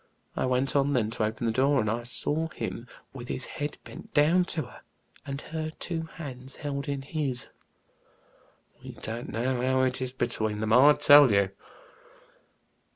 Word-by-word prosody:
I -, -, 0 dB
went 130 Hz, +2 st, 0 dB
on 140 Hz, 0 st, +3 dB
then 110 Hz, -4 st, +1 dB
to 115 Hz, -, -2 dB
open 110 Hz, +2 st, -3 dB
the 115 Hz, -, +2 dB
door, 135 Hz, +3 st, +3 dB
and 110 Hz, -, 0 dB
I 115 Hz, +3 st, -1 dB
saw 150 Hz, +6 st, -2 dB
him 120 Hz, -6 st, -6 dB, 0.3 s
with 125 Hz, -2 st, -8 dB
his 130 Hz, -, -2 dB
head 145 Hz, 0 st, -5 dB
bent -, -, -12 dB
down 165 Hz, +5 st, +4 dB
to 160 Hz, -3 st, -2 dB
her, 125 Hz, -, -14 dB, 0.5 s
and 140 Hz, 0 st, -4 dB
her 155 Hz, -1 st, -2 dB
two 165 Hz, -2 st, -4 dB
hands 130 Hz, -4 st, -8 dB
held 140 Hz, -2 st, -4 dB
in 140 Hz, -1 st, -3 dB
his. 140 Hz, -4 st, -2 dB, 1.3 s
We -, -, -8 dB
don't 115 Hz, +2 st, -5 dB
know 120 Hz, +3 st, -1 dB
how 130 Hz, +1 st, +2 dB
it 130 Hz, 0 st, 0 dB
is 130 Hz, -1 st, -2 dB
between 110 Hz, -4 st, -2 dB
them, 110 Hz, 0 st, 0 dB
I 140 Hz, +5 st, +8 dB
tell 145 Hz, -3 st, +7 dB
you." 100 Hz, -1 st, +3 dB
130 Hz, 170 wpm, -28 LUFS, 120-145 Hz, 1.3 s, I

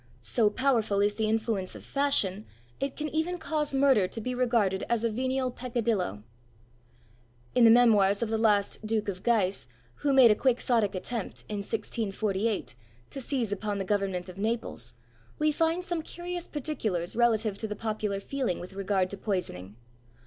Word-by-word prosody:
So 220 Hz, -4 st, +2 dB
powerful 225 Hz, -4 st, +1 dB
is 205 Hz, +1 st, +3 dB
the 215 Hz, 0 st, -1 dB
influence 220 Hz, -4 st, -1 dB
of -, -, -10 dB
fashion, 220 Hz, -8 st, +1 dB, 0.3 s
it 275 Hz, 0 st, -2 dB
can 305 Hz, -, -2 dB
even 320 Hz, +4 st, -1 dB
cause 305 Hz, -3 st, -2 dB
murder 270 Hz, -8 st, +4 dB
to 225 Hz, -, -5 dB
be 250 Hz, +3 st, -3 dB
regarded 230 Hz, -6 st, +1 dB
as 235 Hz, -1 st, +1 dB
a 230 Hz, -, +1 dB
venial 255 Hz, +2 st, -1 dB
peccadillo. 230 Hz, -, -2 dB, 1.3 s
In 245 Hz, -2 st, +5 dB
the -, -, +8 dB
memoirs 220 Hz, -3 st, +5 dB
of 225 Hz, -, -2 dB
the 225 Hz, -, 0 dB
last 210 Hz, -2 st, +2 dB
Duke 215 Hz, -1 st, -1 dB
of 185 Hz, -2 st, -5 dB
Guise, 205 Hz, -, +1 dB, 0.3 s
who 285 Hz, -, 0 dB
made 260 Hz, -4 st, +7 dB
a -, -, +4 dB
Quixotic 235 Hz, -4 st, +1 dB
attempt, 220 Hz, +3 st, -4 dB
in 210 Hz, -, -4 dB
1648, 205 Hz, -, -2 dB, 0.4 s
to 275 Hz, -, -5 dB
seize 245 Hz, -5 st, -1 dB
upon 205 Hz, 0 st, -2 dB
the 195 Hz, -, -2 dB
government 195 Hz, -2 st, -1 dB
of 185 Hz, +1 st, -10 dB
Naples, 225 Hz, +3 st, -3 dB, 0.4 s
we 305 Hz, 0 st, +2 dB
find 330 Hz, +3 st, 0 dB
some 345 Hz, -2 st, -2 dB
curious 350 Hz, +2 st, -6 dB
particulars 225 Hz, -, -2 dB
relative 225 Hz, -3 st, +2 dB
to 220 Hz, -, -1 dB
the 210 Hz, -, -4 dB
popular 210 Hz, -2 st, -2 dB
feeling 255 Hz, -3 st, -2 dB
with 180 Hz, +2 st, -9 dB
regard 195 Hz, -1 st, 0 dB
to 200 Hz, -, -5 dB
poisoning. 180 Hz, -, -3 dB
220 Hz, 165 wpm, -28 LUFS, 200-255 Hz, 1.3 s, the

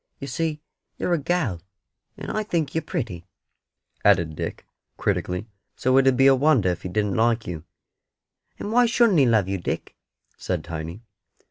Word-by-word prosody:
You -, -, -7 dB
see 150 Hz, +3 st, -2 dB, 0.3 s
you're 180 Hz, -, 0 dB
a 170 Hz, -, +2 dB
gal, 140 Hz, -, -1 dB, 0.6 s
and -, -, -5 dB
I 215 Hz, -, -1 dB
think 170 Hz, -8 st, -1 dB
you're 160 Hz, -, 0 dB
pretty," 110 Hz, -, -4 dB, 0.8 s
added 80 Hz, -2 st, +3 dB
Dick, -, -, -5 dB, 0.3 s
critically; 90 Hz, +2 st, -1 dB, 0.3 s
"so 130 Hz, +1 st, +1 dB
it 135 Hz, 0 st, +5 dB
'ud 130 Hz, -2 st, +4 dB
be 135 Hz, -, +5 dB
a 135 Hz, -, +8 dB
wonder 135 Hz, -7 st, +3 dB
if 90 Hz, -1 st, -2 dB
He 90 Hz, -, -5 dB
didn't 105 Hz, +1 st, 0 dB
like 115 Hz, +2 st, +2 dB
you." 85 Hz, -2 st, -6 dB, 0.9 s
"And 205 Hz, -, -5 dB
why 245 Hz, +1 st, +5 dB
shouldn't 230 Hz, -6 st, +4 dB
He 135 Hz, -, +5 dB
love 110 Hz, -5 st, +3 dB
you, 95 Hz, 0 st, -2 dB
Dick?" -, -, -4 dB, 0.4 s
said 90 Hz, -4 st, -2 dB
Tiny. 85 Hz, +5 st, -6 dB
120 Hz, 170 wpm, -24 LUFS, -, 0.9 s, a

